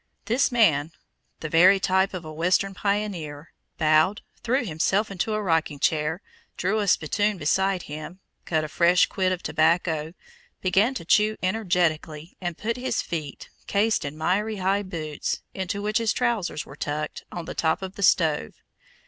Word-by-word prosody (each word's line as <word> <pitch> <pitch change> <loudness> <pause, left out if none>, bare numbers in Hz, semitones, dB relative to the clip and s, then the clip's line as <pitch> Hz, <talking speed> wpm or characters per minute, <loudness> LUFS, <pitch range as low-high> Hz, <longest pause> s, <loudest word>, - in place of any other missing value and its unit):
This 245 +4 +2
man, 165 -10 +3 0.5
the 155 - -3
very 180 +5 +6
type 190 0 +1
of 175 -3 -6
a 155 - -7
Western 180 +4 +1
pioneer, 185 -7 -3 0.2
bowed, 155 +6 +3 0.2
threw 250 +2 0
himself 195 +5 0
into 195 +3 -1
a 215 - -1
rocking 160 -5 0
chair, 155 +4 0 0.3
drew 195 +5 0
a 205 - -1
spittoon 205 +4 +1
beside 190 0 +1
him, 155 +5 -8 0.3
cut 155 -2 0
a - - -3
fresh 175 +3 +4
quid 185 -1 -1
of 180 -1 -3
tobacco, 160 0 +1 0.4
began 200 +8 +2
to 170 - -6
chew 215 +4 +3
energetically, 175 -5 -1
and 175 -2 -3
put 230 +2 -2
his 255 +1 -1
feet, 155 -5 -6 0.2
cased 210 +2 +1
in 145 +1 -6
miry 205 +7 0
high 195 +1 +1
boots, 160 -6 -4
into 200 +2 -3
which 215 +2 +1
his 225 -1 +1
trousers 225 -11 -1
were 135 - -12
tucked, 150 +1 -4
on 175 -2 -6
the - - -6
top 160 +3 0
of 190 0 -6
the 200 - -9
stove. 160 - +2
180 Hz, 165 wpm, -25 LUFS, 160-205 Hz, 0.5 s, very